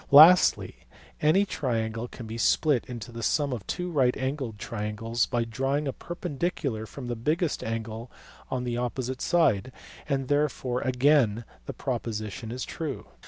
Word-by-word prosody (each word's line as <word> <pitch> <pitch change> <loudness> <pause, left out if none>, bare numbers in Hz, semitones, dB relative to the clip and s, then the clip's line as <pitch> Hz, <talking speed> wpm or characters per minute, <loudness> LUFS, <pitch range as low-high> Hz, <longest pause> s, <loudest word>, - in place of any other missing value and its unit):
Lastly 160 +6 +7 0.3
any 170 +7 +4
triangle 115 - -2
can 120 - -9
be 110 +1 -6
split 145 0 +3
into 120 -1 -7
the 115 0 -7
sum 140 +4 +1
of 110 -6 -6
two 180 0 -3
right 130 -5 +2
angled 130 -4 -3
triangles 115 +2 -2
by 120 -2 0
drawing 135 +6 -1
a 135 - -1
perpendicular 150 -9 -3
from 130 +5 -8
the 120 0 -2
biggest 155 +8 0
angle 115 +1 -4 0.4
on 125 -1 -2
the 120 -1 -2
opposite 125 +1 -3
side, 130 - +2 0.4
and 135 -2 0
therefore 140 -3 0
again 125 -4 +3 0.2
the - - -4
proposition 110 0 -4
is 125 +2 -4
true. 155 -5 -5
125 Hz, 150 wpm, -27 LUFS, 115-145 Hz, 0.4 s, Lastly